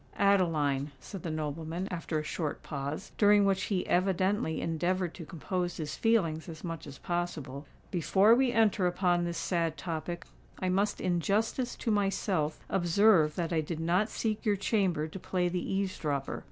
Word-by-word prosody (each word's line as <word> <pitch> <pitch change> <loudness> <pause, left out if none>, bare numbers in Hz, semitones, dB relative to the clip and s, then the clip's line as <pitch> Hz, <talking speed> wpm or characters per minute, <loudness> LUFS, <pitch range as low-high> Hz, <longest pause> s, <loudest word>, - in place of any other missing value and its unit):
"Adeline," 155 -8 +2
said 195 +7 -8
the 170 - -4
nobleman, 160 +3 -3
after 165 -2 -2
a 155 - -1
short 155 0 -3
pause, 140 0 -5
during 205 -1 +6
which 190 -1 +1
he 190 -3 -1
evidently 185 -1 +1
endeavoured 175 +2 -1
to 165 -4 -9
compose 175 +1 -3
his 155 -1 -4
feelings 170 -8 +1
as 160 -2 -9
much 165 -3 -5
as 140 - -9
possible, 155 -6 -4 0.2
"before 190 +5 +4
we 255 +1 +3
enter 215 -5 +3
upon 175 -1 +1
this 170 -1 -3
sad 165 -1 -1
topic, 170 +1 -4 0.3
I 185 - -1
must 200 +3 +1
in 180 -2 +1
justice 220 - 0
to 230 - -2
myself 195 -6 0
observe 175 -3 +4
that 170 -1 -2
I 160 - +2
did 155 +1 -5
not 180 +6 +1
seek 215 -1 -2
your 210 -2 +2
chamber 190 -6 +1
to 175 +5 -8
play 180 -1 0
the 180 0 -2
eaves 195 -1 -1
dropper. 140 -3 -2
175 Hz, 170 wpm, -30 LUFS, 160-195 Hz, 0.3 s, during